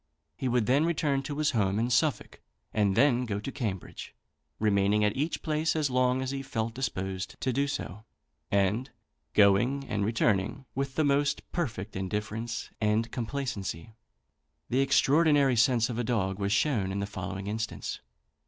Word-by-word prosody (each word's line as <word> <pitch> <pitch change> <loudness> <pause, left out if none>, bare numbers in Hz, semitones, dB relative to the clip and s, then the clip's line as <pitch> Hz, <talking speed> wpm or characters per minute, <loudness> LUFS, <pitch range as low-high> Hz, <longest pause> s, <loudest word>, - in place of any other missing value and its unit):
He 130 - -3
would 120 -2 +2
then 135 +6 +3
return 150 -4 +1
to 145 +1 -5
his 155 -1 +2
home 100 -3 +1
in 120 +3 0
Suffolk, 145 +5 0 0.3
and 100 -3 +2
then 125 -1 +4
go 100 -2 -2
to 120 +6 -5
Cambridge, 100 -9 -5 0.4
remaining 105 0 +2
at 105 - +1
each 150 +5 -2
place 155 +1 0
as 150 -4 0
long 130 +1 +2
as 130 - -3
he 135 0 -3
felt 115 -4 -3
disposed 95 -7 -4
to 130 - -1
do 140 +2 +1
so, 110 - -5 0.5
and 100 - +1 0.5
going 110 +7 +4
and 105 -3 -1
returning 110 +3 0
with 135 0 -3
the 155 - +2
most 140 +1 +1
perfect 110 - -3
indifference 105 +5 -3
and 110 +2 +1
complacency. 115 - -4 0.8
The 130 - +2
extraordinary 140 0 +4
sense 120 0 +3
of 120 -2 -4
a - - 0
dog 105 -5 -1
was 100 0 -1
shown 105 -4 +1
in 100 - -2
the 100 - -1
following 95 -1 -5
instance. 110 +2 -4
115 Hz, 160 wpm, -29 LUFS, 100-135 Hz, 0.8 s, then